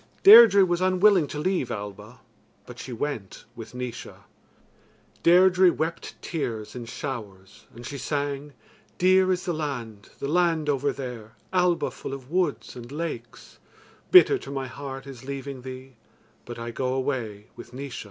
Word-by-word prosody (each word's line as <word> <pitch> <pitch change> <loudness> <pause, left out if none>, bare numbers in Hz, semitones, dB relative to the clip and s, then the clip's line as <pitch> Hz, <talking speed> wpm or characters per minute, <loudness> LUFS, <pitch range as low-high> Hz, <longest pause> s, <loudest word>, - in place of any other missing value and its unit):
Deirdre 400 - +9
was 175 -1 -1
unwilling 185 -2 +4
to 150 - -7
leave 180 -4 -1
Alba, 105 +2 -8 0.4
but - - -11
she - - -8
went 115 -5 -5
with 115 +1 -10
Naois. 125 -1 -6 1.1
Deirdre 185 +1 +5
wept 165 +1 -4
tears 115 -10 -4
in 120 -2 -7
showers 110 -5 -8
and 120 +1 -10
she 140 +1 -6
sang: 145 0 -3 0.4
Dear 185 +1 +4
is 185 0 -1
the 175 - -1
land, 120 -9 -5
the 140 - -4
land 165 -1 +1
over 140 0 +1
there, 120 -5 -8 0.2
Alba 180 -2 +2
full 135 - -7
of 135 +1 -13
woods 175 -4 -1
and 120 0 -10
lakes; 145 -7 -7 0.5
Bitter 380 +2 +7
to - - -10
my 135 -1 -3
heart 135 +1 -8
is 135 -3 -10
leaving 140 -1 -6
thee, 130 0 -10 0.5
But 120 0 -8
I 115 0 -5
go 130 +2 -2
away 120 -6 -3
with 120 - -12
Naois. 135 +1 -7
140 Hz, 150 wpm, -25 LUFS, 120-170 Hz, 1.1 s, Deirdre